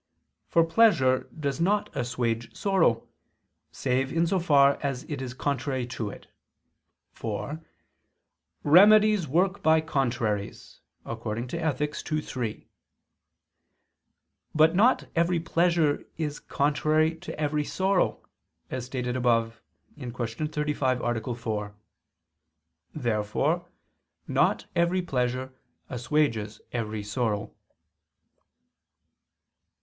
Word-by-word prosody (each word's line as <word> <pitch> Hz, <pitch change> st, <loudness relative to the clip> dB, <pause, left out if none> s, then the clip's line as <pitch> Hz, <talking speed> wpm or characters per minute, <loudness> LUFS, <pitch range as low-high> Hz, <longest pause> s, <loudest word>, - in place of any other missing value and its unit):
For 165 Hz, -, +4 dB
pleasure 165 Hz, -, +3 dB
does 140 Hz, +1 st, -2 dB
not 205 Hz, +4 st, +1 dB
assuage 115 Hz, -1 st, -2 dB
sorrow, 190 Hz, -, +2 dB, 0.6 s
save 130 Hz, +1 st, -1 dB
in 165 Hz, +1 st, +2 dB
so 185 Hz, +3 st, +1 dB
far 140 Hz, -4 st, +4 dB
as 135 Hz, -3 st, -2 dB
it 145 Hz, -3 st, -5 dB
is 125 Hz, -1 st, -6 dB
contrary 130 Hz, -2 st, -2 dB
to 110 Hz, -2 st, -3 dB
it: -, -, -11 dB, 0.9 s
for 130 Hz, +8 st, -5 dB, 1.0 s
"remedies 205 Hz, +3 st, +6 dB
work 185 Hz, +7 st, +1 dB
by 160 Hz, -2 st, +5 dB
contraries" 120 Hz, -9 st, -2 dB, 0.3 s
(Ethic. 125 Hz, +7 st, -3 dB, 0.2 s
ii, 155 Hz, -, +2 dB
3). 125 Hz, -7 st, -5 dB, 1.9 s
But 155 Hz, +2 st, +5 dB
not 225 Hz, +8 st, +4 dB
every 170 Hz, +1 st, +2 dB
pleasure 165 Hz, -2 st, +1 dB
is 150 Hz, -2 st, -3 dB
contrary 155 Hz, +3 st, +1 dB
to 175 Hz, -2 st, -8 dB
every 150 Hz, 0 st, 0 dB
sorrow; 190 Hz, +4 st, 0 dB, 0.5 s
as 130 Hz, -1 st, -4 dB
stated 125 Hz, -1 st, -3 dB
above 115 Hz, -3 st, +1 dB, 0.4 s
(Q. 125 Hz, -3 st, -6 dB, 0.4 s
35, 150 Hz, -4 st, 0 dB
A. 120 Hz, 0 st, -2 dB
4). 105 Hz, -3 st, -4 dB, 1.2 s
Therefore 130 Hz, +7 st, 0 dB, 0.6 s
not -, -, +2 dB
every 175 Hz, +2 st, +2 dB
pleasure 130 Hz, -3 st, -2 dB, 0.4 s
assuages 120 Hz, -4 st, 0 dB
every 110 Hz, -3 st, -3 dB
sorrow. 105 Hz, -1 st, -2 dB
140 Hz, 95 wpm, -27 LUFS, 120-165 Hz, 1.9 s, remedies